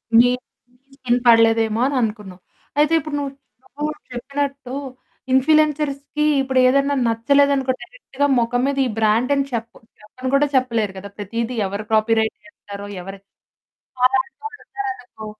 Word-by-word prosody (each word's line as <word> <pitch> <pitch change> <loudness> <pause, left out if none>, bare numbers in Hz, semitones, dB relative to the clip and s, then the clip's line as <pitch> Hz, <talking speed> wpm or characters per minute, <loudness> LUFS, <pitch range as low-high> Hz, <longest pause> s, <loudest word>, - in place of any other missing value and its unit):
మీ - - +9 0.6
మీ 275 - -42
స్కిన్‌కి 250 -2 0
పడలేదేమో 225 -1 +4
అననుకున్నావు. 210 -8 -3 0.4
అయితే 300 +2 +3
ఇప్పుడు 290 0 -5
నువ్ 280 -1 -3 0.5
నువ్వు 300 +1 -1 0.2
చెప్పినట్టు 275 +1 -4 0.6
ఇన్‌ఫ్లుయెన్సర్స్‌కి 300 +1 +2 0.2
ఇప్పుడు 265 -1 +1
ఏదైనా 275 +2 +2
నచ్చలేదనుకో, 270 +3 +2
డైరెక్ట్‌గా 285 - -3
మొఖం 240 +1 0
మీద 280 - -1
ఈ - - 0
బ్రాండ్ 225 +5 +2
అని 275 0 +1
చెప్పు 230 0 -4 0.2
చెప్పను 255 +5 -6
కూడా 290 +1 +3
చెప్పలేరు 230 -6 +1
కదా! 200 +2 -8
ప్రతిదీ 230 +4 -3
ఎవరు 200 +2 -4
కాపీరైట్ 220 0 +2
చేస్తారో 200 -1 -10 0.2
ఎవరికీ 195 +1 -10 0.8
అలంటోళ్ళు 375 +11 -2
ఓచ్చారనుకో 380 - -7
255 Hz, 125 wpm, -21 LUFS, 225-280 Hz, 0.8 s, మీ